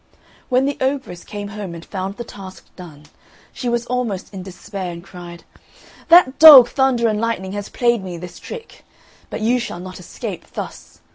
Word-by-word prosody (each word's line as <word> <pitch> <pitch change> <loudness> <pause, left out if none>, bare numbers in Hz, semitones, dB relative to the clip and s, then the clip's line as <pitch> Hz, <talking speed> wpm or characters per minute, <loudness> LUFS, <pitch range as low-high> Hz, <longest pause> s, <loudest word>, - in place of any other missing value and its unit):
When 255 +1 +3
the 285 0 -2
ogress 260 -10 -2
came 205 -1 -7
home 200 -4 -7
and 165 - -10
found 195 +1 -5
the 240 - -5
task 195 -4 -11
done, 160 -5 -12 0.5
she 245 - -3
was 240 0 -1
almost 240 -7 -3
in 190 - -6
despair, 190 0 -7
and 170 0 -9
cried, 175 -2 -11 0.6
"That 335 -5 +6
dog 280 -6 +11
Thunder 260 -4 +2
and 215 -1 0
Lightning 230 -5 -2
has 205 0 -5
played 235 -4 +1
me 180 -2 -6
this 175 +1 -10
trick; 470 -1 -10 0.5
but - - -5
you 240 +3 +2
shall 235 -7 -5
not 185 +1 -9
escape 180 - -7
thus! - - -8
205 Hz, 180 wpm, -20 LUFS, 185-250 Hz, 0.6 s, dog